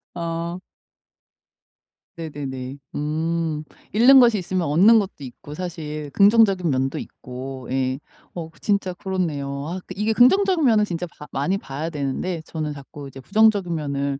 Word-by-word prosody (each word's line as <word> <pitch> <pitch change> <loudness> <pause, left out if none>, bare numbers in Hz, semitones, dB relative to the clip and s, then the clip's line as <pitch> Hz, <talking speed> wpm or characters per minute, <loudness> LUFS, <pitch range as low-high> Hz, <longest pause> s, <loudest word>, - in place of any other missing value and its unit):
어. 170 +1 -3 1.6
네네네. 140 -4 -6 0.2
음. 160 +1 -1 0.3
잃는 250 +6 +7
것이 235 -3 +5
있으면 185 -2 -2
얻는 195 +10 +6
것도 200 -2 -2
있고 130 +3 -10
사실 155 -3 -5
긍정적인 200 -4 +5
면도 135 -1 0
있고 130 0 -8
예 130 0 0 0.4
어 165 -2 -5
진짜 200 -3 0
그렇네요. 155 -8 -3
아 180 +2 -4 0.2
이게 210 +3 0
긍정적인 345 - +4
면은 220 -4 +5
진짜 180 -4 -3
봐 150 - -13
많이 145 +8 0
봐야 150 -2 -5
되는데 155 +3 -3
저는 155 -2 -4
자꾸 140 0 -10
이제 135 0 -11
부정적인 205 0 +3
면을 140 -3 -2
165 Hz, 285 characters per minute, -23 LUFS, 140-195 Hz, 1.6 s, 잃는